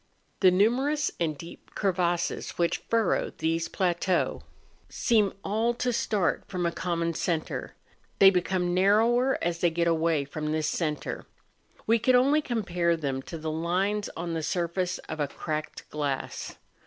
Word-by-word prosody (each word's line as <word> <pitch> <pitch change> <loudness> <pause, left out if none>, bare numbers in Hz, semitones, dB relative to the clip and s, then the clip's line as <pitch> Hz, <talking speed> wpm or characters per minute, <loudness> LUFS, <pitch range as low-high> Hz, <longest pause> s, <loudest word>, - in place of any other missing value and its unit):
The 190 - +7
numerous 255 +10 +2
and 155 -3 -1
deep 165 +3 -12
crevasses 175 -3 -1
which 170 -1 +1
furrow 230 -1 +2
these 165 +1 0
plateaux 180 0 0 0.5
seem 215 -4 +2
all 225 +4 0
to 245 0 -1
start 205 -6 0
from 180 -2 -2
a 170 - +1
common 170 -1 -1
centre; 160 0 -2 0.4
they 195 -1 +8
become 180 -1 0
narrower 225 +7 +3
as 170 0 -1
they 175 - +3
get 170 +1 0
away 165 -3 +2
from 150 +2 -4
this 155 -1 0
centre. 155 -3 -3 0.6
We 230 +1 +3
could 255 +3 +3
only 280 +5 +4
compare 175 - 0
them 135 -4 -2
to 165 - -7
the 160 0 -4
lines 185 +6 0
on 170 0 -3
the 165 - -1
surface 175 +2 -1
of 155 - -5
a 145 - +1
cracked 155 +2 -5
glass. 145 -3 -3
175 Hz, 150 wpm, -27 LUFS, 165-205 Hz, 0.6 s, they